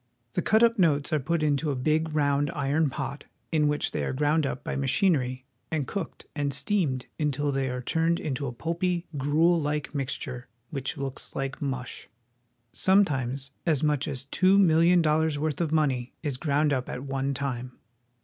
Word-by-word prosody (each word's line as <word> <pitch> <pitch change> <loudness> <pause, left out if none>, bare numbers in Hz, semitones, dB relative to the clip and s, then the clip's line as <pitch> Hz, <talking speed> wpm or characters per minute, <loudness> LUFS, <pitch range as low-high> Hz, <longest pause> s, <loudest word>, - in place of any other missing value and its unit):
The - - 0
cut 230 +3 +4
notes 150 -5 +2
are 155 - +3
put 160 +4 -1
into 150 +1 +1
a 140 - 0
big 155 +5 +1
round 145 -1 +2
iron 145 +2 +1
pot, 135 +1 -5 0.3
in 155 -2 +3
which 150 0 0
they - - -2
are - - -2
ground 150 +2 +2
up 130 - -5
by - - -3
machinery 135 -3 +1 0.2
and 155 -4 -1
cooked 185 +3 -5
and 145 -1 0
steamed 145 -4 0
until 145 -1 0
they 135 -1 0
are 125 0 -4
turned 165 +5 +1
into 140 -1 -3
a - - -3
pulpy, 170 +6 -1
gruel 160 +5 +3
like 150 0 -2
mixture 130 -3 -4 0.2
which 140 +1 -3
looks 135 -1 -5
Hke 135 0 -3
mush. 135 -3 -4 0.6
Sometimes 140 -9 +1
as 155 -4 +1
much 150 -1 +1
as 135 -4 -3
two 185 +7 +3
million 170 -1 +5
dol 155 0 +3
lars' 160 -2 0
worth 155 +2 -1
of 160 -3 0
money 135 -6 +1
is 145 -5 -2
ground 145 0 +1
up 130 -2 -2
at 125 - -5
one 135 0 -2
time. 125 -2 -3
145 Hz, 180 wpm, -27 LUFS, 135-160 Hz, 0.6 s, million